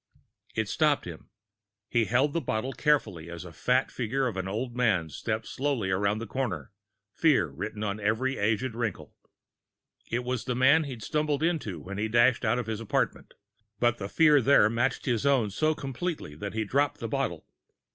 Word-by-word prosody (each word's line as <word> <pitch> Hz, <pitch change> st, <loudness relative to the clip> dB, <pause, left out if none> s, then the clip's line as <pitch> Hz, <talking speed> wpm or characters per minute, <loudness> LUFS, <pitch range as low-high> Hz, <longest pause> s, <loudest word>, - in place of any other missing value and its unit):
It 110 Hz, -1 st, 0 dB
stopped 150 Hz, +6 st, +2 dB
him. 85 Hz, -3 st, -9 dB, 0.6 s
He 120 Hz, -2 st, +2 dB
held 130 Hz, +7 st, +2 dB
the 170 Hz, -, 0 dB
bottle 125 Hz, +1 st, -2 dB
carefully, 105 Hz, -, 0 dB
as 85 Hz, +1 st, -7 dB
the 85 Hz, -2 st, -10 dB
fat 125 Hz, -, +1 dB
figure 130 Hz, +3 st, -1 dB
of 120 Hz, -6 st, -2 dB
an 95 Hz, 0 st, -3 dB
old 120 Hz, +5 st, -3 dB
man 105 Hz, -10 st, +2 dB
stepped 110 Hz, +7 st, -3 dB
softly 130 Hz, -8 st, -1 dB
around 100 Hz, +2 st, +1 dB
the 115 Hz, -, -5 dB
corner, 105 Hz, -, -3 dB, 0.4 s
fear -, -, +3 dB
written 110 Hz, 0 st, -5 dB
on 105 Hz, 0 st, -2 dB
every 110 Hz, +6 st, 0 dB
aged 115 Hz, +4 st, 0 dB
wrinkle. 115 Hz, -4 st, -4 dB, 1.0 s
It 120 Hz, +2 st, -1 dB
was 125 Hz, -1 st, -3 dB
the 125 Hz, -, -1 dB
man 140 Hz, +5 st, +5 dB
he'd 125 Hz, -6 st, -7 dB
stumbled 150 Hz, +1 st, 0 dB
into 155 Hz, -, -1 dB
when 100 Hz, +6 st, -7 dB
he 110 Hz, -, 0 dB
dashed 120 Hz, +3 st, +3 dB
out 115 Hz, +1 st, +2 dB
of 125 Hz, -, -2 dB
his 110 Hz, -1 st, -3 dB
apartment. 115 Hz, -, -2 dB, 0.4 s
But 120 Hz, -1 st, +2 dB
the 100 Hz, 0 st, -4 dB
fear 150 Hz, 0 st, +5 dB
there 115 Hz, -4 st, +5 dB
matched 120 Hz, +3 st, 0 dB
his 120 Hz, -4 st, 0 dB
own 130 Hz, -7 st, +2 dB
so 155 Hz, +9 st, +1 dB
completely 140 Hz, -, -4 dB
that 100 Hz, +8 st, -6 dB
he 110 Hz, -, 0 dB
dropped 140 Hz, +6 st, +1 dB
the -, -, -3 dB
bottle. -, -, -2 dB
120 Hz, 185 wpm, -28 LUFS, 105-135 Hz, 1.0 s, man